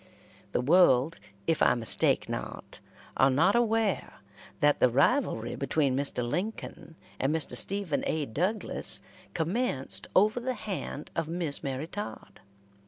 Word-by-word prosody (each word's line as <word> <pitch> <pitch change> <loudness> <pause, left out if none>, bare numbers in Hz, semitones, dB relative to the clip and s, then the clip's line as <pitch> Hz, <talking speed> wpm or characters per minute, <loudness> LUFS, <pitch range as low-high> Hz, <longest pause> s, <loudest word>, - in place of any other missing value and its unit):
The - - 0
world, 155 -1 +4 0.3
if 165 -2 0
I - - +5
mistake 115 -2 +2
not, - - -6 0.4
are 135 - +5
not 165 - +3
aware 225 -3 +1 0.5
that 145 -2 +3
the 125 - +5
rivalry 140 - +1
between 140 -1 0
Mr. 135 -3 -1
Lincoln 175 - -5 0.2
and 135 - +1
Mr. 160 -3 -2
Stephen 200 -6 +1
A. 155 -2 -1
Douglas 180 - -1 0.3
commenced 160 - -1
over 215 +5 +4
the 255 +1 -3
hand 195 -8 -5
of 165 -2 -1
Miss 165 -3 0
Mary 135 +2 -3
Todd. 205 +5 -8
160 Hz, 130 wpm, -29 LUFS, 135-205 Hz, 0.5 s, I